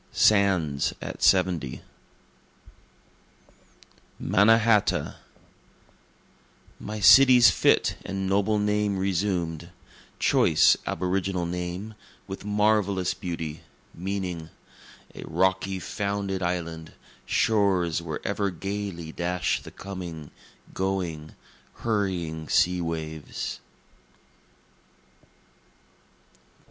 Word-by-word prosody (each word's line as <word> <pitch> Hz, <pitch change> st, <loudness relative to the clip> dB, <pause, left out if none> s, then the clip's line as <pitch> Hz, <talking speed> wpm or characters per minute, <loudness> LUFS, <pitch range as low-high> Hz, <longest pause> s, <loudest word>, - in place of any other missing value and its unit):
SANDS 95 Hz, -9 st, +2 dB
AT -, -, -7 dB
SEVENTY 85 Hz, -9 st, +2 dB, 2.4 s
Mannahatta 110 Hz, +1 st, +3 dB, 1.6 s
My 105 Hz, 0 st, -6 dB
city's 125 Hz, +3 st, +8 dB
fit -, -, +2 dB
and 95 Hz, 0 st, -4 dB
noble 100 Hz, +2 st, +1 dB
name 105 Hz, -1 st, 0 dB
resumed, 90 Hz, -4 st, -2 dB, 0.5 s
Choice -, -, +4 dB
aboriginal 90 Hz, -1 st, -1 dB
name, 90 Hz, +5 st, -5 dB, 0.3 s
with 95 Hz, 0 st, -8 dB
marvellous 105 Hz, -3 st, +1 dB
beauty, 80 Hz, -5 st, -6 dB, 0.3 s
meaning, 90 Hz, -3 st, -4 dB, 0.6 s
A -, -, -9 dB
rocky 95 Hz, +3 st, 0 dB
founded 100 Hz, +2 st, -3 dB
island 85 Hz, -2 st, -4 dB, 0.3 s
shores 95 Hz, -7 st, +1 dB
where 80 Hz, -3 st, -6 dB
ever 100 Hz, 0 st, 0 dB
gayly 95 Hz, -2 st, -5 dB
dash 90 Hz, +1 st, -1 dB
the -, -, -11 dB
coming, 85 Hz, -6 st, -8 dB, 0.4 s
going, 90 Hz, -5 st, -3 dB, 0.4 s
hurrying 90 Hz, -8 st, -2 dB
sea 90 Hz, 0 st, +2 dB
waves. 80 Hz, -2 st, -5 dB
95 Hz, 75 wpm, -26 LUFS, 85-100 Hz, 2.4 s, city's